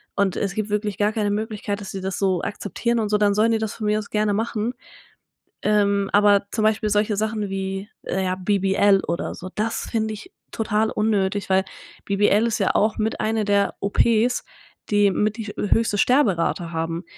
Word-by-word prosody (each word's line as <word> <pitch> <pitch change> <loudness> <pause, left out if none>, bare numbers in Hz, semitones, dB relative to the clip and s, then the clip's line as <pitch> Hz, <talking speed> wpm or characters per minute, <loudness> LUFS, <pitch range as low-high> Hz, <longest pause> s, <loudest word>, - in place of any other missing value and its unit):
und 200 -2 +1
es 195 0 -2
gibt 215 -1 -2
wirklich 210 -2 -2
gar 210 +1 +2
keine 210 -2 0
Möglichkeit, 210 -1 -3
dass 200 - -7
sie 195 - -5
das 190 0 -3
so 190 -3 +1
akzeptieren 235 +4 -2
und 215 -2 -1
so, 210 - +3
dann 205 -1 +3
sollen 220 +2 +3
die 225 - +1
das 220 -1 -3
von 215 - -5
mir 210 +1 +2
aus 210 - -8
gerne 210 -1 +1
machen. 225 +2 -1 0.9
Ähm, 200 -1 +2
aber 205 -1 +4
zum 220 - -1
Beispiel 215 0 +2
solche 210 0 +1
Sachen 215 -1 -1
wie, 195 +1 -4
äh, 190 +1 -2
ja, 185 0 0
BBL 195 +1 +2
oder 170 +3 -3
so, 185 - -8
das 225 +2 -2
finde 220 -2 -1
ich 370 - -10 0.2
total 220 0 0
unnötig. 205 -2 0
Weil 190 0 +3 0.4
BBL 205 +3 +3
ist 230 0 -1
ja 195 - +1
auch 215 +1 +2
mit 220 0 -1
eine 220 0 0
der 200 -1 +1
OPs, 230 +4 +2 0.4
die 205 -1 +4
mit 210 +3 0
die 220 -2 -5
höchste 210 0 +1
Sterberate 190 - +2
haben 165 +1 -3
205 Hz, 190 wpm, -23 LUFS, 195-215 Hz, 0.9 s, aber